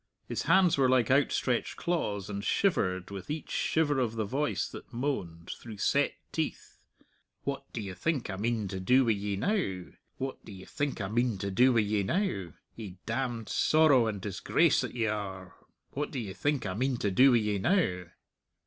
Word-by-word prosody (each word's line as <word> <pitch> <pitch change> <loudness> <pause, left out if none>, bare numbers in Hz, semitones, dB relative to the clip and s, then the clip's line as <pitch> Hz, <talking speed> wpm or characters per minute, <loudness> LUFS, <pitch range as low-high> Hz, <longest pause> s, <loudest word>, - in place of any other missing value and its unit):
His - - -2
hands 185 -6 +4
were 130 -2 +4
like 130 0 +3
outstretched 130 -3 +1
claws, 105 - -1
and 100 -1 -4
shivered 95 - +1
with 95 -2 -7
each 155 +1 -4
shiver 145 -4 +1
of 115 -3 0
the 110 -1 -1
voice 140 +8 -1
that - - -11
moaned, 115 - -3
through 110 -3 -9
set - - +1 0.2
teeth, - - -4 0.6
"What 140 0 -4
do 115 - -4
ye 100 -2 -5
think 145 - -1
I 95 - -4
mean 110 +1 -1
to 95 - -4
do 125 +8 +4
wi' 115 - +3
ye 100 -1 -1
now?... 100 - -1 0.3
What 135 0 -5
do - - -11
ye 95 -1 -10
think 145 -6 -3
I 95 - -2
mean 120 +1 0
to 100 +1 -3
do 125 +7 +5
wi' 115 - +4
ye 105 0 0
now?... 100 - -1 0.2
Ye 100 -5 -8
damned 120 -1 -2
sorrow 150 -7 +4
and 105 -2 -3
disgrace 100 0 +2
that - - -5
ye 115 -2 0
are, 95 -4 -4 0.4
what 145 +2 -3
do - - -6
ye 105 -6 -4
think 145 +1 -1
I 95 - -2
mean 130 +5 0
to 100 - -1
do 130 +8 +6
wi' - - +6
ye 105 -2 0
now?" 95 - +1
115 Hz, 195 wpm, -30 LUFS, 100-135 Hz, 0.6 s, do